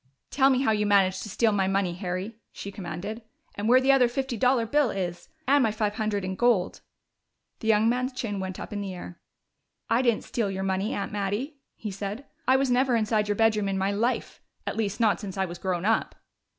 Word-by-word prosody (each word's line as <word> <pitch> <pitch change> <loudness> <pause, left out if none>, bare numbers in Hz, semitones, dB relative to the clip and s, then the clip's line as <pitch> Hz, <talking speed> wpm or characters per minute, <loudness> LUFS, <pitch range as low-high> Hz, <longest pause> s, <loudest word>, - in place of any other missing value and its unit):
"Tell 270 -1 +4
me 260 - +3
just 265 - 0
how 220 - +4
you 210 -1 +1
managed 190 -2 +3
to 210 - -6
steal 225 +3 +2
my 195 -2 +1
money, 195 -2 +1
Harry," 185 +4 -4
she 200 - -7
commanded. 195 +4 -6 0.3
"And 205 +2 -2
where 255 +1 +7
the 265 +1 +4
other 265 -3 +5
fifty 260 +1 -3
dollar 250 +1 +2
bill 285 +3 +2
is 180 -4 -4 0.2
and 285 +1 +5
my 225 - +3
five 210 -1 -1
hundred 210 -2 -1
in 185 - -2
gold." 215 -4 +1 0.8
The 220 - -5
young 220 0 +4
man's 250 +2 +1
chin 230 -6 -4
went 190 -1 -5
up - - -7
in 205 - -3
the 195 -2 -5
air. 175 -1 -9 0.7
"I 235 - +4
didn't 235 -4 +1
steal 225 -4 -2
your 190 0 -3
money, 190 +2 -1
Aunt 200 - -3
Mattie," 210 +9 -3 0.2
he 215 - -6
said. 200 +7 -5 0.2
"I 260 - +6
was 265 -1 +2
never 250 0 +3
inside 215 -1 +1
your 205 - 0
bedroom 215 -2 +2
in 195 - -1
my 190 +1 +1
life 230 +5 -1 0.2
at - - -3
least, 215 -1 -2
not 220 -3 +3
since 195 -2 -7
I 190 - +1
was 175 -1 -8
grown 185 -2 -2
up!" 225 +1 +1
210 Hz, 225 wpm, -27 LUFS, 195-240 Hz, 0.8 s, where